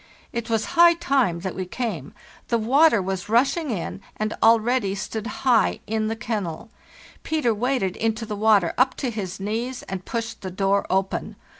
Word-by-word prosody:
It 235 -1 -4
was 225 -1 +1
high 340 0 +7
time 270 - +1
that 190 0 -3
we 185 -1 -5
came; 185 - -4 0.3
the 235 - +1
water 240 0 +4
was 190 +1 -4
rushing 275 +7 +2
in 195 -2 -4 0.2
and 215 0 -1
already 225 -2 +3
stood 215 +3 -4
high 245 -2 +2
in 220 0 -1
the 225 - -2
kennel. 215 -3 -4 0.5
Peter 305 -7 0
waded 220 -4 -1
into 225 0 -1
the 215 -1 -4
water 205 -4 +3
up 260 +1 +3
to 255 -4 -2
his 195 -4 -5
knees 230 +6 -3
and 190 -1 -6
pushed 230 0 -4
the 190 - -5
door 195 +2 0
open. 190 0 -1
220 Hz, 170 wpm, -24 LUFS, 195-245 Hz, 0.5 s, high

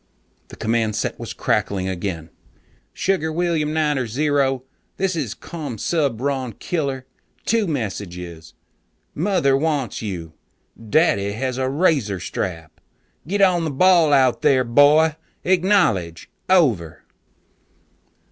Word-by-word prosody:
The - - -12
command 110 -1 0
set - - -3
was - - -6
crackling 95 -2 -1
again. 85 -3 -4 0.6
"Sugar 185 -4 -1
William 160 -2 0
Niner 150 -5 0
Zero, 135 +1 0 0.3
this 190 -1 0
is 135 -11 -3
Commsubron 140 - -2
Killer. 140 -7 -3 0.4
Two 225 -3 +1
messages. 90 - -5 0.6
Mother 160 -6 +2
wants 145 -3 -1
you. 85 -7 -6 0.6
Daddy 100 -9 +2
has 130 +3 -3
a 130 0 0
razor 135 - +1
strap. 80 -2 -5 0.5
Get 200 +3 0
on 180 -3 +4
the 160 - -1
ball 170 +1 +4
out 130 -3 +3
there, 140 -4 +4
boy! 150 +6 +4 0.3
Acknowledge. 175 - +1 0.2
Over." 120 - +2
135 Hz, 110 wpm, -21 LUFS, 105-160 Hz, 0.6 s, on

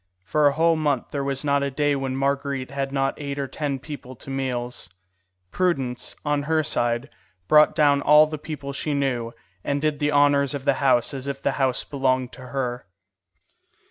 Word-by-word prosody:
For 145 +10 +3
a 140 - +3
whole 165 +2 +3
month 145 -5 0
there 140 -1 -2
was 135 0 -2
not 140 -1 +2
a 140 - 0
day 145 +1 +1
when 135 -1 -2
Marguerite 140 -1 -1
had 140 -1 -3
not 135 +1 -1
eight 140 -1 -4
or 140 -1 -2
ten 145 -1 -3
people 135 -2 -9
to 135 - -10
meals. 125 -6 -3 0.6
Prudence, 135 -10 -1
on 145 -1 +1
her 155 +2 +1
side, 120 -2 -1 0.4
brought 150 0 +6
down 145 -2 +4
all 150 +2 +7
the 155 -1 -6
people 145 -2 -6
she 145 +1 -2
knew, 125 -5 -1 0.3
and 140 0 -1
did 150 0 -1
the 150 0 +1
honours 145 -1 +3
of 140 -1 -6
the - - +4
house 130 -3 +3
as 135 0 -5
if 140 -1 -3
the - - 0
house 130 -1 +2
belonged 130 -2 0
to 125 +1 -11
her. 125 -4 -3
140 Hz, 190 wpm, -24 LUFS, 130-145 Hz, 0.6 s, all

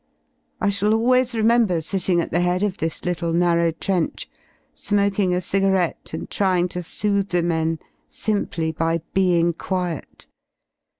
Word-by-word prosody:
I 205 - +1
shall 205 +2 +2
always 250 +1 +2
remember 225 -5 +3
sitting 180 +1 0
at - - -5
the 175 - +1
head 180 +2 +1
of 200 -2 -1
this 165 0 -3
little 170 -2 -1
narrow 170 -1 +3
trench, 170 +2 -2 0.5
smoking 200 -2 +1
a 180 - +1
cigarette 190 -1 0
and - - -5
trying 180 -3 +1
to 180 - -4
soothe 200 +3 0
the 175 -2 +1
men 165 -1 0 0.3
simply 170 -7 -2
byTemg 170 +1 +1
quiet. 180 -4 -4
180 Hz, 135 wpm, -22 LUFS, 170-200 Hz, 0.5 s, remember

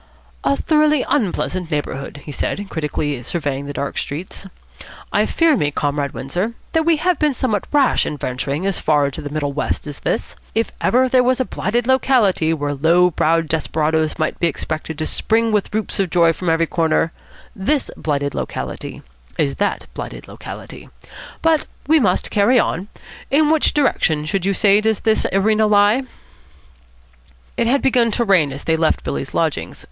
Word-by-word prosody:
"A 280 - +2
thoroughly 305 -2 +2
unpleasant 185 - -1
neighbourhood," 145 -2 -4
he 150 - -6
said, 200 +8 -3
critically 150 -4 -2
surveying 140 0 -3
the - - -4
dark 140 0 -3
streets. 175 +6 -6 0.7
"I - - +3
fear 330 -2 +3
me, 150 - +1
Comrade 145 -1 -1
Windsor, 180 - -2 0.2
that 320 0 +1
we 330 -2 +4
have 355 +3 +1
been 300 -3 +2
somewhat 215 -7 -1
rash 285 -3 +3
in 150 - -4
venturing 140 +6 -3
as 195 -3 0
far 150 -2 +2
into 140 - -4
the 145 - -6
middle 145 -1 -2
west 150 - -2
as 145 -2 -7
this. - - -2 0.2
If 225 +1 0
ever 255 +2 +3
there 255 0 +4
was 255 +1 +2
a 260 - +1
blighted 235 +2 -1
locality 245 -10 +3
where 145 -2 -1
low 170 +5 +3
browed 165 +1 +1
desperadoes 155 0 0
might 155 -1 -2
be 170 - +2
expected 155 0 -4
to 155 - -2
spring 225 +5 +1
with 210 -2 0
whoops 215 -1 -2
of 195 -2 +1
joy 170 -1 +4
from 175 +2 -3
every 165 0 +2
corner, 165 0 +1 0.4
this 270 +10 0
blighted 145 -2 -2
locality - - -5 0.3
is 140 -2 0
that 205 - -1
blighted - - -7
locality. - - -10 0.5
But 325 -2 +2 0.2
we 315 +1 +4
must 190 -9 +1
carry 210 +5 +4
on. 185 -2 -1 0.4
In 300 +2 +3
which 320 -1 +3
direction, 160 - +1
should 190 +4 -1
you 200 - +1
say, 205 +1 +4
does 220 -1 0
this 220 -1 +2
arena 215 +2 +3
lie?" 210 +4 +4 1.5
It 230 - +1
had 275 +4 +2
begun 245 -3 +3
to 235 - +1
rain 180 -9 +3
as 135 +1 -7
they 160 - +1
left 160 0 +1
Billy's - - -4
lodgings. - - -1
185 Hz, 175 wpm, -19 LUFS, 155-235 Hz, 1.5 s, we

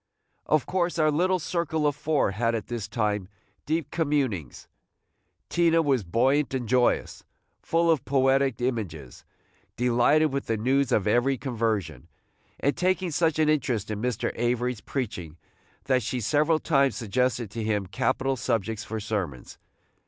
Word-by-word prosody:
Of 155 -3 +2
course 175 -2 -1
our 155 -1 +3
little 185 +5 +2
circle 160 -2 -1
of 145 -1 +2
four 150 -6 +1
had, 115 +4 0
at 110 - -5
this 120 -3 -4
time, 105 -5 -1 0.4
deep 155 -2 -1
communings. 140 - -1 0.8
Tina 165 -1 +3
was 135 -7 +1
buoyant 130 - +1
and 125 -3 -3
joyous, 125 +1 +1 0.4
full 165 0 +2
of 155 -6 +1
poetic 135 -2 +2
images, 95 - -4 0.5
delighted 125 +5 +3
with 140 - -3
the 115 - 0
news 130 +4 +1
of 100 - +2
every 120 +5 +2
conversion, 110 - -2 0.5
and 140 - +1
taking 185 -1 0
such 160 0 +1
an 155 -1 +3
interest 125 -8 0
in 105 0 -4
Mr. 125 -2 -1
Avery's 120 -1 -1
preaching 95 - -5 0.5
that 130 -2 +2
she 125 +3 -3
several 150 +7 +2
times 140 -4 +2
suggested 120 -1 -1
to 115 0 -4
him 105 -2 0
capital 130 +6 0
subjects 110 -3 -2
for 110 - -5
sermons. 100 - -4
125 Hz, 145 wpm, -26 LUFS, 110-150 Hz, 0.8 s, our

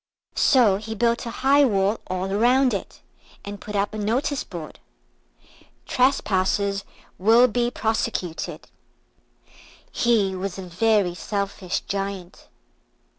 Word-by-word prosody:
So 230 -8 +4
he 220 +2 -6
built 235 +2 0
a 230 - -7
high 285 +2 +6
wall 205 -3 +1
all 185 +1 -2
round 245 +5 +3
it, 200 - -6 0.4
and 205 0 -7
put 210 0 -7
up 200 +1 0
a 215 - -4
notice 250 +7 -1
board. 165 -4 -9 1.1
TRESPASSERS 200 -6 +1 0.4
WILL 225 +6 +6
BE 240 +1 0
PROSECUTED 220 -7 -3 1.2
He 215 -5 +2
was 185 0 -4
a 190 - -6
very 190 +1 +1
selfish 200 0 -3
Giant. 195 -2 -5
205 Hz, 115 wpm, -23 LUFS, 195-235 Hz, 1.2 s, high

